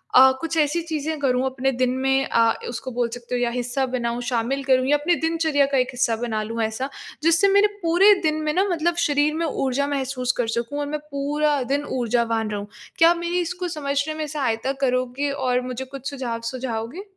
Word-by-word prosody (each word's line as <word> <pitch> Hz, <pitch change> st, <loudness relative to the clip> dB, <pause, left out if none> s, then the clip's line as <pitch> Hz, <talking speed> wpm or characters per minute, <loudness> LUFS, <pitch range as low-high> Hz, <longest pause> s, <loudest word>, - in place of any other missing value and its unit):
अ, 265 Hz, +1 st, +9 dB
कुछ 330 Hz, 0 st, -2 dB
ऐसी 305 Hz, +3 st, +2 dB
चीज़ें 315 Hz, -1 st, -3 dB
करूँ 255 Hz, -2 st, +1 dB
अपने 265 Hz, 0 st, 0 dB
दिन 255 Hz, 0 st, +1 dB
में 270 Hz, +1 st, +2 dB
अ, 230 Hz, -1 st, +3 dB, 0.2 s
उसको 245 Hz, +2 st, -5 dB
बोल 240 Hz, -1 st, -1 dB
सकते 245 Hz, 0 st, -5 dB
हो 245 Hz, -, -1 dB
या 240 Hz, -, +2 dB
हिस्सा 245 Hz, +2 st, -1 dB
बनाऊँ, 245 Hz, -2 st, -2 dB
शामिल 245 Hz, +3 st, -1 dB
करूँ 260 Hz, -1 st, +3 dB
या 295 Hz, +2 st, +4 dB
अपने 325 Hz, +4 st, +1 dB
दिनचर्या 320 Hz, -3 st, +1 dB
का 275 Hz, -, +2 dB
एक 250 Hz, -1 st, +2 dB
हिस्सा 245 Hz, -2 st, +1 dB
बना 220 Hz, -1 st, -2 dB
लूँ 225 Hz, +2 st, -4 dB
ऐसा, 220 Hz, +5 st, -2 dB, 0.3 s
जिससे 330 Hz, +4 st, +4 dB
मेरे 405 Hz, +1 st, +6 dB, 0.2 s
पूरे 355 Hz, +5 st, +6 dB
दिन 310 Hz, 0 st, +1 dB
में 305 Hz, 0 st, 0 dB
ना, 375 Hz, -, +3 dB
मतलब 340 Hz, 0 st, +1 dB
शरीर 290 Hz, 0 st, +2 dB
में 335 Hz, +1 st, -1 dB
ऊर्जा 275 Hz, -2 st, -1 dB
महसूस 265 Hz, -3 st, -1 dB
कर 245 Hz, -, 0 dB
सकूँ 235 Hz, +5 st, -3 dB
और 290 Hz, -, -2 dB
मैं 300 Hz, +1 st, -3 dB
पूरा 290 Hz, +1 st, 0 dB
दिन 285 Hz, +1 st, +1 dB, 0.2 s
ऊर्जावान 230 Hz, -2 st, 0 dB
रहूँ। 205 Hz, -1 st, -4 dB, 0.3 s
क्या 330 Hz, -, +7 dB
आप 345 Hz, -, 0 dB
मेरी 345 Hz, +1 st, -1 dB
इसको 360 Hz, +1 st, -3 dB
समझने 280 Hz, +1 st, -1 dB
में 310 Hz, 0 st, -3 dB
सहायता 265 Hz, -4 st, -1 dB
करोगे 255 Hz, +2 st, 0 dB
और 255 Hz, -3 st, 0 dB
मुझे 255 Hz, +1 st, -4 dB
कुछ 270 Hz, +1 st, -6 dB
सुझाव 250 Hz, -5 st, -4 dB
सुझाओगे? 255 Hz, -, -4 dB
270 Hz, 205 wpm, -23 LUFS, 245-305 Hz, 0.3 s, अ